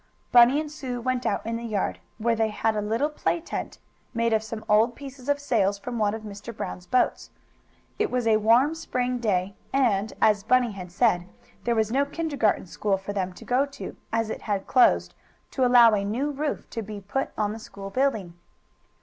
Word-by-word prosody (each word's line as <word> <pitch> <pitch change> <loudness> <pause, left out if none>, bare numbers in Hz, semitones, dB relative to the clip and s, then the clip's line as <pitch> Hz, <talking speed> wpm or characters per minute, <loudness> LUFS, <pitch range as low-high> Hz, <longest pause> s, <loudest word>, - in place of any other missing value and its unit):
Bunny 245 +4 +7
and 305 -1 -4
Sue 260 -5 -5
went 255 +1 -1
out 200 - -1
in 230 0 -2
the 235 - -7
yard, 215 -4 -2 0.2
where 230 +1 +1
they 220 0 +1
had 215 +1 0
a 210 - 0
little 225 +7 0
play 335 +3 -1
tent, 330 - -5 0.4
made 230 0 +1
of 220 - +3
some 220 0 -7
old 220 +3 +4
pieces 275 -1 -9
of 285 0 +2
sails 205 -8 +1
from 235 +3 -5
one 210 0 +1
of 220 - -8
Mr. 210 +2 -8
Brown's 180 0 -6
boats. 255 - +1 0.7
It 430 -1 +1
was 250 -2 -1
a 220 -1 +4
warm 235 +8 +4
spring 250 -6 -2
day, 195 -4 0 0.2
and, 220 -6 +2
as 210 -2 +4
Bunny 245 +2 +3
had 180 -3 -8
said, 180 -3 +2 0.4
there 235 -1 +2
was 220 -1 +1
no 275 +3 +3
kindergarten 285 - 0
school 195 +2 -1
for 195 +1 -6
them 190 -2 -2
to - - -13
go 260 +3 +2
to, 280 - -8 0.2
as 225 -1 0
it - - -5
had 200 -3 -2
closed, 90 - +4 0.4
to 265 - 0
allow 240 -2 +7
a 200 -1 +1
new 245 +9 -1
roof 290 +1 -3
to 230 - -3
be 210 -1 -7
put 205 +8 -2
on 210 -1 0
the 225 - -7
school 195 -2 -9
building. 220 -9 0
225 Hz, 205 wpm, -26 LUFS, 205-255 Hz, 0.7 s, Bunny